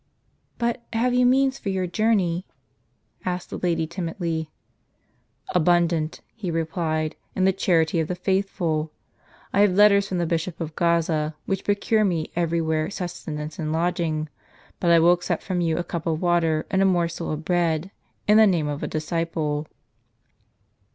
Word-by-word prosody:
"But 235 +1 -1
have 245 +2 +1
you 250 0 +4
means 265 +1 +3
for 200 - -4
your 190 -1 0
journey?" 185 -3 +1 0.8
asked 180 -1 -3
the - - -4
lady, 170 -2 0
timidly. 165 -2 -3 1.0
"Abundant," 170 -2 +2
he 210 -6 -5
replied, 160 -1 -1 0.2
"in 185 - +2
the 190 - +4
charity 165 -3 +2
of 160 - 0
the 180 - -2
faithful. 180 -4 -1 0.6
I - - +2
have 205 -2 +5
letters 200 -1 +6
from 185 - -1
the 175 - +1
Bishop 165 +1 -2
of 160 -2 -5
Gaza, 165 -2 +1
which 195 -1 -2
procure 210 +2 +2
me 170 -6 -1
every 170 -1 +1
wiiere 160 +1 0
sustenance 160 -5 -5
and 155 -1 -2
lodging; 165 -2 0 0.5
but 175 - +1
I 170 - +7
will 170 +2 +6
accept 175 0 -2
from 180 -2 -1
you 165 -2 +1
a - - -1
cup 170 -1 -5
of 160 -1 0
water 165 -3 +1
and 190 - +2
a - - +4
morsel 170 -2 0
of 155 +1 -4
bread, 175 0 0 0.4
in 210 +1 +6
the 220 -1 +7
name 170 -6 +1
of 145 0 -3
a - - -2
disciple." 155 -1 -2
170 Hz, 165 wpm, -24 LUFS, 160-190 Hz, 1.0 s, I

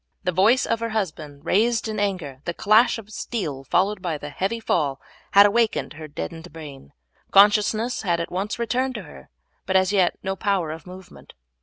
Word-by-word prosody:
The 180 - 0
voice 205 +9 +3
of 230 - 0
her 230 0 -2
husband 155 -7 -5
raised 225 +5 +2
in 215 -1 -3
anger, 180 -10 -3
the 170 - -3
clash 215 +5 +4
of 215 -1 -11
steel, 160 - -4
followed 190 +8 +1
by 170 -4 -2
the 145 0 -8
heavy 195 +10 -2
fall, 145 -10 0 0.3
had 200 +1 +9
awakened 225 -2 +1
her 155 +1 -9
deadened 165 +3 -7
brain. 145 - -11 0.4
Consciousness 210 +4 +4
had 175 -4 0
at 170 - -4
once 195 +4 -3
returned 245 +3 -1
to 215 - -5
her, 65 - -14 0.4
but 190 - -1
as 190 +1 +3
yet 185 -3 +2
no 190 0 -2
power 190 -6 -1
of 160 +3 -9
movement. 185 0 -13
190 Hz, 185 wpm, -23 LUFS, 160-215 Hz, 0.4 s, had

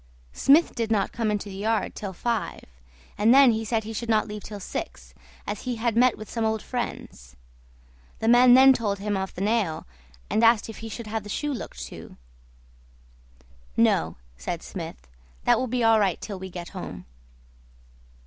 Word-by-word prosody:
Smith 300 +5 +4
did 230 -2 -2
not 205 -3 +1
come 230 -2 -1
into 210 0 -2
the 195 -1 -8
yard 220 +2 -1
till 200 -2 -6
five, 190 - -3 0.6
and 215 +3 +5
then 270 -1 +7
he 220 0 -1
said 220 0 -1
he 220 +1 -6
should 235 +2 -5
not 215 -1 +2
leave 210 0 -6
till 205 0 -8
six, - - -6 0.3
as 205 0 -4
he 250 -1 -3
had 230 0 -1
met 245 0 +4
with 215 - -9
some 230 - -3
old 220 0 +1
friends. 65 - -6 0.8
The 220 - -3
man 245 +1 +7
then 265 +1 +8
told 210 -5 -1
him 205 +1 -2
of 190 0 -4
the 180 - -6
nail, 205 -6 0 0.4
and 220 - +1
asked 230 -1 +4
if 220 - -8
he 225 - -7
should 235 +1 -7
have 220 +1 -3
the 205 - -11
shoe 295 +7 -2
looked 250 - -7
to. - - -11 1.6
"No," 80 +1 +2 0.2
said 65 - -5
Smith, - - -8 0.4
"that - - +4
will 255 - -1
be 245 0 -1
all 225 -1 +5
right 195 -5 +1
till 200 -3 -6
we 190 0 -7
get 175 -1 -7
home." 90 - -8
220 Hz, 185 wpm, -25 LUFS, 195-235 Hz, 1.6 s, then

